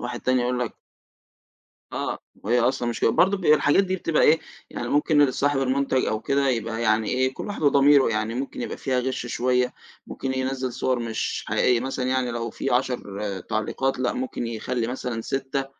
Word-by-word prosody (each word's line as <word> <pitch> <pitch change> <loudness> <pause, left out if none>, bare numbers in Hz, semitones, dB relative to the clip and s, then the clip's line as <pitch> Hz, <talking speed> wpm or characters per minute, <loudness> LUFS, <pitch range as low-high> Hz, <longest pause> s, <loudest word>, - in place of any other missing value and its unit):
واحد 120 0 -5
تاني 130 0 +2
يقول 125 0 0
لك 120 - -4 1.2
آه، - - -3 0.2
وهي 120 +4 +2
أصلًا 125 0 +1
مش 120 - -4
كده. - - +3
برضو 195 - +3
ب 185 - -7
الحاجات 150 +4 +5
دي 185 0 -1
بتبقى 165 -3 0
إيه 160 +2 +5 0.3
يعني - - -5
ممكن 145 -2 +3
صاحب 145 +1 +1
المنتج 130 0 +1
أو 110 - -1
كده 140 +2 +1
يبقى 115 -1 -2
يعني 110 -1 +2
إيه 130 +1 +1
كل - - -6
واحد 205 - -5
وضميره 140 -2 +5
يعني 110 +1 -1
ممكن 135 +3 -4
يبقى - - -4
فيها 130 -2 0
غش 130 -1 -3
شويّة، 125 +1 +1 0.3
ممكن 130 0 -4
ينزّل 130 -1 -2
صور 130 -1 0
مش 115 -1 -3
حقيقيّة 125 -2 +2
مثلًا 130 0 -3
يعني 130 -1 0
لو 115 0 -3
في 135 - -4
10 125 -6 -1 0.2
تعليقات 110 +7 -2
لأ، 125 - 0
ممكن 125 -2 -3
يخلّي 115 +1 -2
مثلًا 125 -2 -4
6 135 +2 -2
130 Hz, 185 wpm, -24 LUFS, 120-135 Hz, 1.2 s, الحاجات